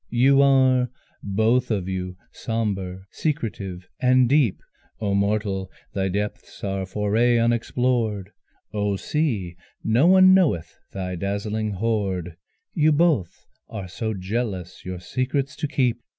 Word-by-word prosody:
You 135 +3 +4
are 130 -2 +4 0.3
both 110 +5 +1
of 100 -5 -1
you, 90 -1 -4
sombre, 95 -5 -3
secretive 100 - -3
and 130 0 +4
deep: 135 -6 +3 0.4
Oh 100 -2 -1
mortal, 100 -1 0 0.2
thy 95 -1 0
depths 105 +2 -4
are 95 -1 -2
foraye 110 +5 +2
unexplored, 115 -3 0 0.4
Oh 105 -1 0
sea 105 - -1 0.3
no 120 +9 +3
one 185 0 +7
knoweth 155 - +2 0.2
thy 90 -1 -4
dazzling 105 +3 -2
hoard, 95 -5 -1 0.4
You 155 -2 +3
both 145 - +1 0.2
are 95 - -6
so 110 +4 -3
jealous 95 -2 -4
your 90 -1 -5
secrets 130 +7 -2
to 150 - -2
keep! 125 -4 0
110 Hz, 120 wpm, -24 LUFS, 95-125 Hz, 0.4 s, one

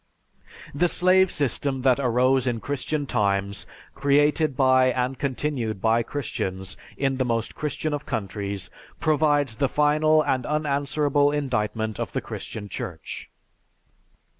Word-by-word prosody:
_) - - -17
The 175 +5 +2
slave 185 +2 +4
system 135 -2 -1
that 130 0 +4
arose 130 +1 +2
in 120 -2 0
Christian 145 +3 -2
times, 100 -5 -1 0.3
created 145 +1 +2
by 130 -1 +5
and 125 0 -1
continued 130 -6 -2
by 115 +3 +3
Christians 95 -7 -4 0.2
in 135 -1 0
the 130 - +1
most 115 -2 -1
Christian 150 +1 -3
of 145 0 -4
countries, 100 -2 -4 0.3
provides 145 -6 +2
the 140 -2 +1
final 155 +1 +3
and 130 -3 0
unanswerable 145 0 +1
indictment 110 -6 -2
of - - -4
the - - -1
Christian 105 -2 -7
Church. 90 -4 -7
135 Hz, 130 wpm, -25 LUFS, 115-145 Hz, 0.3 s, by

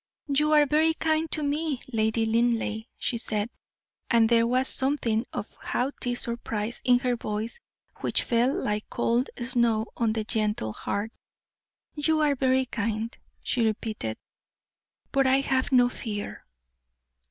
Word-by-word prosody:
"You 300 +2 +2
are 300 -1 +6
very 315 +3 +3
kind 315 0 0
to 305 - 0
me, 290 -1 -1
Lady 220 0 +1
Linleigh," 225 -1 +1
she 235 - -2
said; 215 0 -1 0.6
and 230 -2 +5
there 230 0 +4
was 255 +2 +2
something 255 -4 +1
of 205 - -5
haughty 245 -1 -2
surprise 235 -2 -2
in 250 -1 +5
her 250 -1 0
voice 220 - -4 0.4
which - - 0
fell 240 +2 +2
like 210 -5 -2
cold 240 +3 +1
snow 235 -3 +2
on 225 -2 +1
the 220 -1 -1
gentle 210 - -1
heart. 205 - -3 0.8
"You 310 +1 +1
are 295 -2 +3
very 260 -1 +2
kind," 225 0 -2 0.3
she 245 - +1
repeated, 215 - -2 0.9
"but 275 -1 +3
I 265 +1 +4
have 265 0 0
no 250 -2 +6
fear." 210 -4 -6
235 Hz, 140 wpm, -27 LUFS, 220-265 Hz, 0.9 s, are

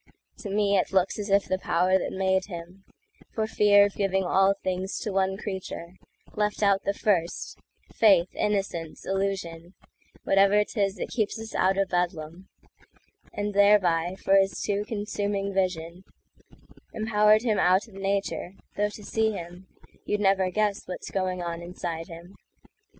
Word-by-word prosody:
To 205 - -6
me 200 -1 +2
it - - -2
looks 190 +2 +1
as 205 0 -4
if 200 0 +3
the 185 - -1
power 185 +1 +2
that - - -4
made 190 0 +1
him, 180 +1 -10 0.5
For 220 - 0
fear 205 -2 +5
of 205 - -3
giving 195 -1 0
all 195 +2 +3
things 185 +1 -2
to 210 - -3
one 190 0 +1
creature, 190 -4 -6 0.4
Left 210 0 -1
out 200 -1 +3
the 200 - +1
first,—faith, 185 0 0
innocence, 195 -6 -2
illusion, 190 -3 -3 0.5
Whatever 200 +2 +4
'tis 200 -2 -1
that 180 - -5
keeps 220 -1 -2
us 225 0 -8
out 190 +1 +2
o' 195 - +2
Bedlam,—And 180 +4 -6
thereby, 190 -4 +3
for 195 +1 +3
his 195 -2 +1
too 205 0 -1
consuming 205 -2 -2
vision, 180 -2 -2 0.9
Empowered 215 0 +3
him 220 -4 +1
out 185 +5 +3
of 220 - -17
nature; 195 -1 -2 0.2
though 205 0 +1
to 210 0 -11
see 220 +1 0
him, 175 0 -9 0.4
You'd 210 - -1
never 195 -2 +3
guess 210 +1 0
what's 180 - -7
going 185 -2 -2
on 170 0 -4
inside 170 -1 -5
him. 170 +3 -12
195 Hz, 150 wpm, -26 LUFS, 180-205 Hz, 0.9 s, fear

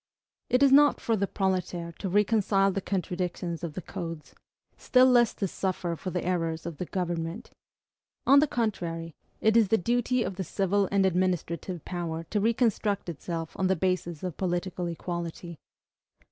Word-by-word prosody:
It 250 +3 +4
is 275 - +6
not 290 +1 +6
for 225 - 0
the 200 -1 0
proletaire 180 -3 -1
to 195 - -3
reconcile 200 -1 +3
the 195 - -2
contradictions 180 -2 -3
of 165 -3 -4
the 185 - -5
codes, 165 -2 -7 0.4
still 255 0 +4
less 240 -3 +4
to 195 - -1
suffer 180 -2 -2
for 185 - -5
the 180 -1 -3
errors 165 -3 -1
of 170 -3 -5
the 180 - -4
government. 175 +3 -3 0.7
On 280 +1 +7
the 300 - +3
contrary, 170 - -2 0.3
it 220 0 +3
is 225 -3 +5
the 225 - +3
duty 245 +4 +1
of 185 - -4
the 190 - -2
civil 195 +2 0
and 195 -1 +3
administrative 180 -2 -1
power 170 -2 -4
to 210 - +1
reconstruct 220 -4 +1
itself 165 0 -5
on 190 - +1
the 190 - +2
basis 175 -2 -1
of 180 -4 -4
political 180 -1 -2
equality. 170 -1 -5
185 Hz, 165 wpm, -28 LUFS, 170-205 Hz, 0.7 s, On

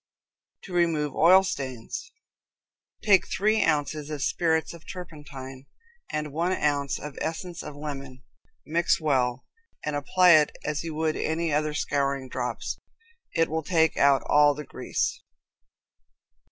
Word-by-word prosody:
To 185 - -9
Remove 160 -5 +1
Oil 185 +4 +6
Stains. 135 - -5 0.9
Take 200 -4 +5
three 215 +2 +2
ounces 150 0 0
of 150 -3 -3
spirits 160 -2 +1
of 170 -2 -12
turpentine 140 -6 -9 0.4
and 150 -1 -3
one 170 +4 0
ounce 145 -4 0
of 150 -1 -8
essence 170 +2 -4
of 150 - -8
lemon, 140 -3 -7 0.4
mix 170 +2 +2
well, 130 -5 0 0.4
and 150 -1 -1
apply 180 +5 +4
it 155 -2 +5
as 150 +1 -2
you 165 -2 -5
would 155 0 0
any 160 0 -1
other 150 0 0
scouring 140 -2 -1
drops. 125 -1 -4 0.6
It 165 -1 +3
will 160 +1 -2
take 160 -1 +2
out 140 -1 +4
all 145 0 +4
the 150 - -7
grease. - - -2
150 Hz, 135 wpm, -26 LUFS, 140-165 Hz, 0.9 s, Oil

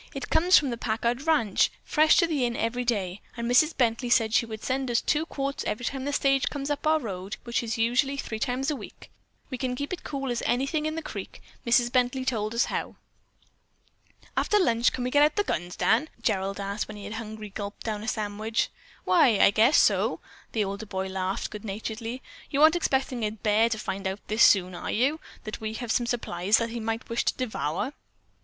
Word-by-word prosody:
"It - - -6
comes 355 +3 +6
from 280 -4 +1
the 235 - -4
Packard 235 +6 -1
ranch, 235 -12 +3
fresh 310 +1 +4
to 340 - +5
the 305 -6 0
inn 240 -1 0
every 245 +2 -1
day, 200 -6 -1 0.2
and 235 0 -2
Mrs. 275 +6 +4
Bently 240 0 +1
said 225 -3 +3
she 235 - +3
would 220 -1 -7
send 265 0 -1
us 235 - +3
two 310 +2 0
quarts 275 -2 -3
every 235 +3 -2
time 270 0 -3
the 285 - -1
stage 275 -1 +2
comes 285 0 -4
up 290 +1 -2
our 315 0 +4
road, 195 -5 -5
which 235 -1 -1 0.2
usually 245 +5 +2
is 275 - -4
three 220 - -5
times 260 +5 -1
a - - -1
week. - - -11 0.4
We 255 - -4
can 255 -2 -1
keep 285 +6 -4
it 360 - -6
cool 275 -3 -3
as 240 - -2
anything 275 +5 0
in 310 - -3
the 325 - -4
creek. - - -7 0.3
Mrs. 240 0 +4
Bently 255 +1 +1
told 220 -3 -1
us 235 - +3
how." - - -4 1.4
"After 420 - +2
lunch 235 - +3
can 250 - -4
we 250 - -2
get 290 - +4
out 300 +1 +4
the 410 - +2
guns, 175 - -3
Dan?" 255 +8 +2
Gerald 195 -1 0
asked 200 +1 -3
when 215 - -8
he 205 - -9
had 210 - -6
hungrily 215 -2 -7
gulped 205 +1 -6
down 215 -2 -3
a 220 - -7
sandwich. 215 0 -1 0.4
"Why, 275 - +5
I - - +6
guess 225 +8 +4
so," - - +3 0.3
the 220 - +1
older 200 +2 -5
boy 190 0 -3
laughed 190 0 -2
good 210 -1 -8
naturedly. 225 +4 -5 0.3
"You 285 +1 +2
aren't 315 +2 +7
expecting 265 -6 0
a 210 - +1
bear 215 +1 +2
to 225 - -1
find 195 -2 -4
out 190 +2 -5
this 215 +2 0
soon, 185 -2 +6
are 175 - -5
you, 275 +8 +1 0.2
that 215 0 -6
we 220 0 -3
have 240 -1 -3
some 240 +1 +1
supplies 205 -4 +1
that 230 -1 -2
he 235 - -4
might 225 +1 -3
wish 230 0 -1
to - - +1
devour?" 220 - -2
235 Hz, 220 wpm, -27 LUFS, 215-270 Hz, 1.4 s, aren't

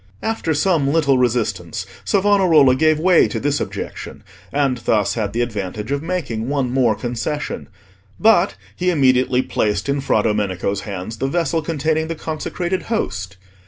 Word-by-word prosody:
After 220 -8 -1
some 150 -3 +2
little 140 -5 +3
resistance 105 -8 -1 0.2
Savonarola 190 -9 +4
gave 155 +2 +3
way 175 +2 +4
to - - -3
this 145 0 0
objection, - - -6 0.3
and 140 -3 +1
thus 105 -3 +1
had 105 -3 -2
the 115 +3 -1
advantage 105 0 -4
of 140 0 0
making 145 -10 -3
one 135 -4 0
more 125 -4 +2
concession; 125 +6 -4 0.5
but 210 -4 +4 0.2
he 180 0 0
immediately 130 -5 +3
placed 105 +1 -1
in 140 0 0
Fra 110 -5 +1
Domenico's 100 -2 -1
hands 100 +3 -5
the 135 - -1
vessel 165 +2 0
containing 160 0 -1
the 165 - -3
consecrated 170 +4 -3
Host. 95 - -3
135 Hz, 150 wpm, -20 LUFS, 110-160 Hz, 0.5 s, Savonarola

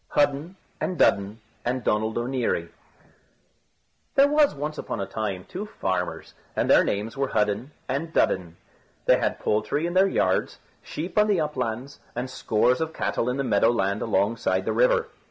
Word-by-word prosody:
HUDDEN 145 +5 +1 0.2
AND 180 - -2
DUDDEN 100 +2 +2 0.2
AND 125 +1 -1
DONALD 110 +1 0
O'NEARY 120 -8 -1 1.5
There 275 +1 +6
was 295 0 +3
once 150 +2 -4
upon - - -4
a 100 - -1
time 100 -2 -4
two 205 +4 -6
farmers, 95 - -3 0.2
and - - +1
their - - +6
names 105 +3 -2
were 135 0 0
Hudden 105 +3 0 0.2
and 140 +5 -2
Dudden. 90 - +1 0.5
They - - +5
had - - 0
poultry 125 +9 0
in 175 - -2
their 190 +1 +5
yards, - - +1 0.2
sheep 170 +6 -3
on 210 - +5
the 200 -4 +2
uplands, 130 -4 -3 0.2
and 125 +2 -3
scores 125 +1 +1
of 160 0 -3
cattle 105 +4 -1
in 125 - -1
the 140 - 0
meadow 115 -3 +3
land 100 -3 0
alongside 110 +1 +1
the - - 0
river. - - +3
125 Hz, 165 wpm, -25 LUFS, 105-160 Hz, 1.5 s, There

